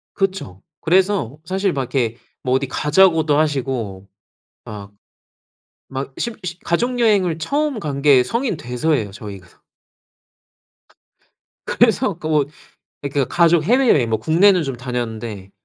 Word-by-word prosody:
그쵸. 190 - -2 0.2
그래서 180 - +1
사실 190 +2 0
막 140 - -1
이렇게 120 -4 0 0.3
뭐 125 - 0
어디 135 +1 0
가자고도 155 +1 +3
하시고 130 -10 -2 0.6
막 100 -1 -9 1.0
막 135 0 -5
십 235 -2 -3
시 175 0 -5
가족여행을 210 -4 +1
처음 285 - -1
간 145 -5 -4
게 140 -3 +6
성인 235 - -2
돼서예요 125 -3 -1
저희가. 100 -3 -11 2.1
그래서 235 -2 +2
그 160 - -6
뭐 150 -3 +2 0.6
그니까 140 -1 -1
가족 170 0 +3
해외여행 230 - +3
뭐 110 - +1
국내는 175 - +4
좀 135 -3 -4
다녔는데 115 -5 -5
150 Hz, 255 characters per minute, -20 LUFS, 125-190 Hz, 2.1 s, 게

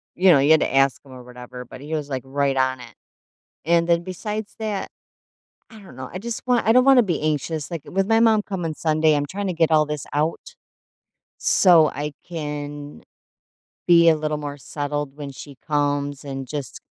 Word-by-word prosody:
you 185 0 +5
know, 145 - +6
you 140 +3 +3
had 160 - +6
to - - -1
ask 135 -1 +3
him 135 - -15
or 125 -1 -11
whatever, 125 0 -10
but 130 +2 -12
he 150 +2 -7
was, 150 -2 -2
like, 130 -1 -3
right 140 0 0
on 130 -1 +1
it. 120 -2 -12 0.7
And 170 +1 +2
then 170 0 +3
besides 210 +4 -6
that, 215 -3 -3 0.8
I 220 -2 -14
don't 190 -10 -14
know, 130 0 -8
I 185 - -5
just 230 +2 -5
want 245 -2 +2
I - - +6
don't 250 +2 +5
wanna 265 -3 +6
be 175 -6 -2
anxious, 155 0 -2
like, 165 -4 -4
with 195 +1 -1
my 225 0 +3
mom 225 -2 +4
coming 175 -6 -4
Sunday, 155 0 +2
I'm 145 0 -1
trying 200 +5 -4
to 180 - -1
get 165 -1 +2
all 155 -1 +4
this 150 -1 -5
out, 160 - -2 0.8
so 170 -5 +5
I 145 +1 -5 0.2
can 145 -3 -6 0.9
be 170 -1 +7
a 160 - +4
little 150 -1 -2
more 145 -1 -6
settled 145 0 -4
when 140 -2 -6
she 140 0 -11
comes 145 -1 -1
and 135 -2 -6
just 145 -3 -6
150 Hz, 200 wpm, -22 LUFS, 140-175 Hz, 0.9 s, be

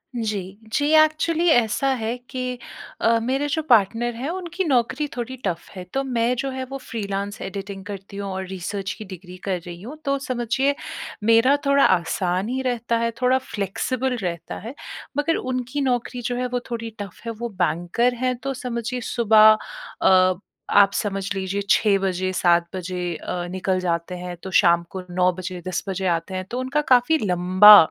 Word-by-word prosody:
जी, 205 -4 -3 0.2
जी 290 - +2
actually 310 +2 +2
ऐसा 240 -1 +3
है 225 -1 -2
कि 255 -1 -3 0.4
अ, 230 0 +4
मेरे 270 +4 0
जो 315 +2 0
पार्टनर 235 +1 +3
हैं 260 +6 -4
उनकी 355 +1 -3
नौकरी 265 +1 +1
थोड़ी 245 +1 -4
टफ़ 175 -3 -3
है। 185 - -6
तो 270 - 0
मैं 245 -2 +1
जो 270 +3 -2
है 260 0 -4
वो 275 - -4
फ़्रीलांस 205 -5 -4
एडिटिंग 195 0 -6
करती 200 0 -8
हूँ 200 0 -4
और 190 0 -4
रिसर्च 190 +1 -4
की 215 - -8
डिग्री 185 -1 -10
कर 185 -2 0
रही 175 0 -8
हूँ 255 +9 -8
तो 275 0 +1
समझिए, 265 +2 0 0.5
मेरा 230 +5 +5
थोड़ा 280 0 +4
आसान 180 +3 +1
ही 260 +1 -1
रहता 240 -2 0
है, 230 0 0
थोड़ा 255 +1 +4
फ़्लेक्सिबल 255 +3 -2
रहता 170 -2 -4
है। 230 +6 -7 0.4
मगर 295 +3 +2
उनकी 255 +2 -2
नौकरी 245 -1 -1
जो 245 +1 -2
है, 250 0 -1
वो 250 0 -1
थोड़ी 230 -1 -3
टफ़ 200 -3 -8
है, 230 - -2
वो 235 +2 -5
बैंकर 175 +9 +1
हैं 255 0 +1
तो 275 0 -1
समझिए, 245 -1 -4
सुबह 215 -2 +5 0.4
अ, 185 0 +5 0.4
आप 200 -1 +6
समझ 195 -1 -2
लीजिए 195 +1 -2
6 210 -2 +4
बजे, 185 -1 -1
7 175 -1 +3
बजे 180 -1 -3
अ, 175 +2 -4
निकल 185 0 0
जाते 170 0 -2
हैं, 180 0 -6
तो 190 - -6
शाम 170 0 +4
को 190 -1 -5
9 180 +1 +3
बजे, 180 0 -6
10 185 - -2
बजे 190 0 -2
आते 165 +4 -9
हैं। 185 0 -3
तो 245 - -2
उनका 260 +4 0
काफ़ी 250 +6 +4
लंबा 185 +3 +8
220 Hz, 180 wpm, -23 LUFS, 185-255 Hz, 0.5 s, लंबा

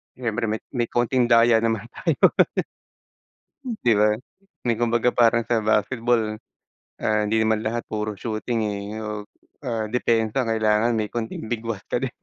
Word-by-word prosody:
Siyempre 120 -2 -2
may 110 +1 -1
may 120 -3 -1
konting 120 +1 +1
daya 115 -1 +5
naman 115 -2 0
tayo. - - -1 1.7
'Di 120 - +4
ba? 105 0 +4 0.5
May 115 -2 0
kumbaga 120 +1 +2
parang 115 -1 +3
sa 115 +1 0
basketball, 110 +1 +1 0.6
ah, 105 0 +1
hindi 110 +1 +1
naman 110 0 +1
lahat 115 +1 -1
puro 105 0 -2
shooting, 110 +3 -3
eh, 100 -1 -4 0.2
o, 105 -1 -5 0.4
ah, 115 -3 -2
depensa 115 +1 +1
ang 115 - 0
kailangan 110 +1 +2
may 110 -2 -1
konting 110 -1 -5
bigwas 115 -3 -3
ka - - +1
din. 130 -1 -3
115 Hz, 150 wpm, -23 LUFS, 110-120 Hz, 1.7 s, daya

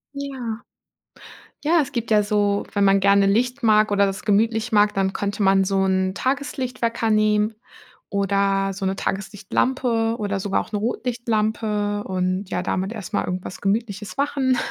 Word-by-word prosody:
Ja. 260 -5 -5 1.1
Ja, 330 +1 +4
es 285 - -4
gibt 235 -4 -4
ja 210 -1 +5
so, 205 -1 0
wenn 200 -1 +2
man 195 0 +5
gerne 200 0 +4
Licht 245 +6 +1
mag 215 -1 +4
oder 200 0 +4
das 195 +1 -3
gemütlich 225 +2 +1
mag, 210 0 +4
dann 195 -1 0
könnte 205 +2 -3
man 195 0 +4
so 195 0 +1
'n 190 0 +1
Tageslicht-Wecker 250 -3 -2
nehmen 215 0 +2 0.5
oder 195 0 +1
so 195 0 -4
'ne 190 0 0
Tageslichtlampe 225 +4 -1
oder 205 -2 -2
sogar 195 0 0
auch - - -11
'ne 210 - -1
Rotlichtlampe 215 -3 -1
und 185 +1 -2
ja - - -1
damit 190 +2 -2
erstmal 205 -1 -3
irgendwas 180 0 -5
Gemütliches 205 0 -2
machen. 275 -2 +1
210 Hz, 155 wpm, -22 LUFS, 195-230 Hz, 1.1 s, ja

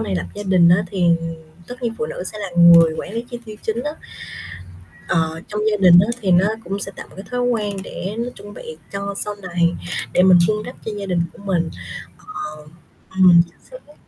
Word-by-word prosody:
này 95 - -2
lập 90 0 -2
gia 205 - -6
đình 185 -3 +4
á 180 +3 +4
thì 180 -3 +1 0.6
tất 250 +1 -10
nhiên 230 -1 -2
phụ 155 - -1
nữ 170 - -6
sẽ 210 - -7
là 200 -2 -4
người 170 -1 +8
quản - - -6
lý 230 - -2
chi 240 - -5
tiêu 215 -1 -9
chính 225 +2 -2
á, 295 - -2 1.2
ờ, 160 0 0
trong 210 0 -3
gia 210 - +1
đình 180 -3 +7
á 195 - +3
thì 190 -3 +1
nó 180 +2 +5 0.2
cũng 195 +1 -4
sẽ 195 - -5
tạo - - -9
một - - -17
cái 195 - -9
thói 245 0 -1
quen 215 -5 -1
để 195 +2 -6
nó 235 +1 -2
chuẩn 205 0 -11
bị 160 -5 -9 0.2
cho 200 0 -4
sau 210 - -3
này, 175 -3 0 0.4
để 180 - +4
mình 185 -1 +7
vun 215 0 0
đắp - - -8
cho 220 - -3
gia 200 - -4
đình 180 -3 0
của - - -15
mình 175 -4 0 0.7
ờ. 155 0 -7 0.4
Ừm, 185 -2 +6
chính - - -25
xác. - - -13
195 Hz, 225 wpm, -20 LUFS, 175-210 Hz, 1.2 s, người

